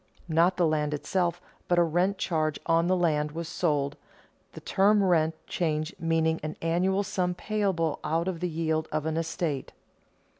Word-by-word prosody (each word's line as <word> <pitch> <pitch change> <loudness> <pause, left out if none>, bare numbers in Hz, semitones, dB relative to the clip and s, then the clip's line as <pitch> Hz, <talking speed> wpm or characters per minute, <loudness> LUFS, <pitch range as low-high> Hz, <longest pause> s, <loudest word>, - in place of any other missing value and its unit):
Not 170 +3 +3
the 175 - +3
land 150 -1 +1
itself 175 +3 -1 0.3
but 175 - +2
a 175 - +6
rent 175 +4 +1
charge 155 -5 -1
on 165 0 +3
the 185 - +3
land 150 -4 +1
was 165 0 -4
sold, 145 -5 0 0.6
the - - -8
term 205 +1 +3
rent 165 -3 +2
charge 155 0 -1
meaning 165 0 +1
an 155 0 -5
annual 185 +4 +1
sum 180 -2 -1
payable 190 -7 -1
out 165 +3 0
of 180 -3 -2
the 180 +1 -1
yield 160 -1 -1
of 155 0 -1
an 160 0 -1
estate. 165 -3 -2
165 Hz, 165 wpm, -28 LUFS, 155-180 Hz, 0.6 s, a